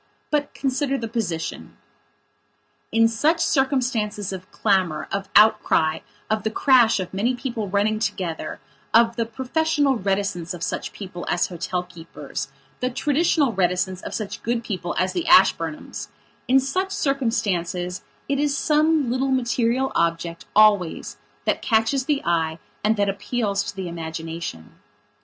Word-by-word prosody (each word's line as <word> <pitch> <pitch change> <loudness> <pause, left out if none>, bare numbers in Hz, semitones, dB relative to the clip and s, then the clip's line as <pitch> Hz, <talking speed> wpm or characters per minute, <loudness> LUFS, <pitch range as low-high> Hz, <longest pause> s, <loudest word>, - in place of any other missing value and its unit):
But 290 -1 0
consider 275 0 0
the 230 - -4
position. 200 -8 -4 1.1
In 225 0 +5
such 295 +9 +1
circumstances 245 - 0
of 185 0 -9
clamour, 185 -7 +1
of 195 0 -3
outcry, 210 -7 +4 0.3
of 215 0 0
the 220 - -1
crash 235 -2 +4
of 185 -1 -5
many 230 +6 +1
people 235 -5 -4
running 210 +2 +1
together, 180 -6 -3 0.4
of 230 0 +5
the 230 -1 -1
professional 280 +3 +1
reticence 195 -4 -1
of 170 - -7
such - - -3
people 185 -3 -8
as 175 - +1
hotel 180 +1 -3
keepers, 165 -6 -7 0.3
the 250 - 0
traditional 290 0 +1
reticence 185 0 0
of - - -6
such 215 -3 -5
"good 235 0 -1
people" 180 -5 -4
as 185 0 +1
the 175 -3 -2
Ashburnhamsin 165 -4 +3 0.5
such 370 +9 0
circumstances 200 - -1 0.3
it 275 0 0
is 290 -1 +1
some 305 -3 +2
little 260 +2 0
material 250 0 +1
object, 170 0 -1
always, 205 -5 +3 0.3
that - - +1
catches 225 +4 +2
the 290 -1 0
eye 165 -2 +1 0.3
and 215 +1 +2
that 200 0 +2
appeals 200 +1 -1
to - - -6
the 190 -2 -4
imagination. 165 - -6
215 Hz, 140 wpm, -23 LUFS, 180-255 Hz, 1.1 s, In